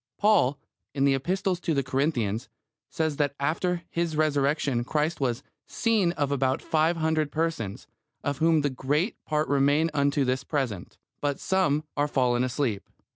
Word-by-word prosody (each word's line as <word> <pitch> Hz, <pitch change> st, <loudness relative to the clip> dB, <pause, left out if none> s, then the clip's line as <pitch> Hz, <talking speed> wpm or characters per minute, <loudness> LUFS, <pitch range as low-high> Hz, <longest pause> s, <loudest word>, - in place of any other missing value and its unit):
Paul, 205 Hz, -10 st, +3 dB, 0.4 s
in 135 Hz, 0 st, +2 dB
the 140 Hz, -, +4 dB
Epistle 185 Hz, +8 st, 0 dB
to 170 Hz, -2 st, -1 dB
the 140 Hz, -, +1 dB
Corinthians, 130 Hz, -5 st, -1 dB, 0.4 s
says 160 Hz, -3 st, -1 dB
that 145 Hz, -2 st, 0 dB
after 170 Hz, +4 st, 0 dB
His 170 Hz, -2 st, -1 dB
Resurrection 145 Hz, -4 st, +1 dB
Christ 150 Hz, +4 st, -1 dB
was 125 Hz, -3 st, -1 dB, 0.2 s
"seen 220 Hz, -7 st, +1 dB
of 145 Hz, -4 st, -1 dB
about 135 Hz, -1 st, +1 dB
five 160 Hz, +2 st, +1 dB
hundred 160 Hz, -2 st, 0 dB
persons; 155 Hz, -11 st, -2 dB, 0.4 s
of 145 Hz, 0 st, -2 dB
whom 160 Hz, -1 st, +4 dB
the 145 Hz, -1 st, 0 dB
great 145 Hz, -, -1 dB
part 150 Hz, 0 st, 0 dB
remain 145 Hz, +3 st, +2 dB
unto 140 Hz, -1 st, +2 dB
this 130 Hz, 0 st, 0 dB
present, 130 Hz, -, -3 dB, 0.2 s
but 145 Hz, -1 st, -1 dB
some 155 Hz, -6 st, +1 dB
are 145 Hz, 0 st, +1 dB
fallen 125 Hz, -3 st, +1 dB
asleep." 125 Hz, -5 st, -2 dB
145 Hz, 155 wpm, -27 LUFS, 135-160 Hz, 0.4 s, the